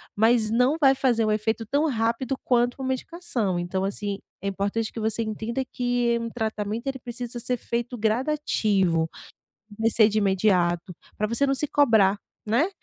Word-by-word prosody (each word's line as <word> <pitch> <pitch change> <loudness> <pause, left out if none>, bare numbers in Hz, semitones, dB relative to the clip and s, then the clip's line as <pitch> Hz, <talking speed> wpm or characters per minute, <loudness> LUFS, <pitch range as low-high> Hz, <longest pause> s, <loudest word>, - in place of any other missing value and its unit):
mas 220 0 +3
não 250 +6 +3
vai 270 -2 +6
fazer 245 -4 +2
um 215 - +1
efeito 220 +2 0
tão 290 +6 +1
rápido 230 +2 -1
quanto 245 -1 +2
uma 260 - -2
medicação. 255 - -2
Então, 175 +2 -2
assim 200 0 -3 0.2
é 200 - -3
importante 200 +3 -2
que 230 - -5
você 220 +1 -1
entenda 220 +4 -3
que 245 -1 0
um 230 - -3
tratamento 220 +1 -3
ele 270 - -2
precisa 240 0 -6
ser 250 +1 -1
feito 240 +1 -3
gradativo. 215 - +1 0.7
Comecei 225 0 +4
de 215 0 0
imediato 185 -3 +1 0.2
para 215 - 0
você 235 +5 +1
não 275 - +2
se 295 +2 -2
cobrar, 220 -9 +4 0.3
né. 240 - +2
225 Hz, 165 wpm, -25 LUFS, 210-250 Hz, 0.7 s, vai